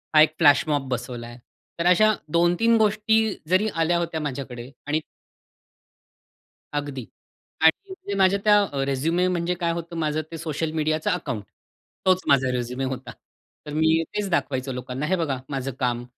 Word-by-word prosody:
हा 155 - +9
एक 155 0 +5
फ्लॅशमॉब 145 -2 +3
बसवलाय. 120 -1 -5 0.4
तर 170 - 0
अशा 215 +4 +5 0.2
2-3 175 +8 +3
गोष्टी 220 0 +2 0.2
जरी 185 +4 +3
आल्या 165 +1 +2
होत्या 165 -2 -2
माझ्याकडे 130 -4 -5 0.2
आणि 155 +2 0 1.8
अगदी 140 -4 -6 0.6
आणि 160 - +3
म्हणजे 205 - -7
माझ्या 195 +1 +4
त्या 210 -1 +6
अ, 140 -8 -2
रेझ्युमे 160 +7 +1
म्हणजे 175 -1 0
काय 170 -2 +1
होतं 170 0 -5
माझं 155 -1 0
ते 165 - -5
सोशल 160 -1 -3
मीडियाचं 155 0 0
अकाउंट. 130 - -3 0.6
तोच 185 0 +4
माझा 135 -2 +4
रेझ्युमे 125 +1 -3
होता. 130 -1 -4 0.5
तर 150 - -7
मी 160 +1 +3
तेच 205 -1 -1
दाखवायचं 135 -6 -1
लोकांना, 125 +3 -4
हे 185 +4 +1
बघा 150 -7 -1
माझं 135 -1 -3
काम 120 -1 -1
155 Hz, 150 wpm, -24 LUFS, 135-175 Hz, 1.8 s, हा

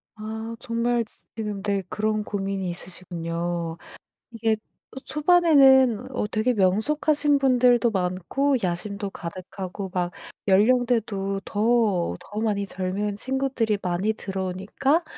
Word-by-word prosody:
아 220 +1 -6
정말 235 -1 0
지 - - -14
지금 210 -3 -4
네 200 -1 -1
그런 215 0 0
고민이 195 -2 -3
있으시군요. 170 -1 -4 0.5
이게 225 -1 +1 0.5
초반에는 275 - +5
어 210 - 0
되게 220 +4 +1
'명석하신 285 +9 +2
분들도 250 -2 +4
많고 190 +9 0
야심도 200 +3 -2
가득하고 185 +2 -6
막 180 -1 0 0.4
연령대도 210 -2 +2
더 210 - +1
더 210 +1 -6
많이 205 -3 0
젊은 195 +2 -2
친구들이 260 -3 0
많이 180 +4 0
들어오니까 195 - -1
210 Hz, 255 characters per minute, -25 LUFS, 190-245 Hz, 0.5 s, 초반에는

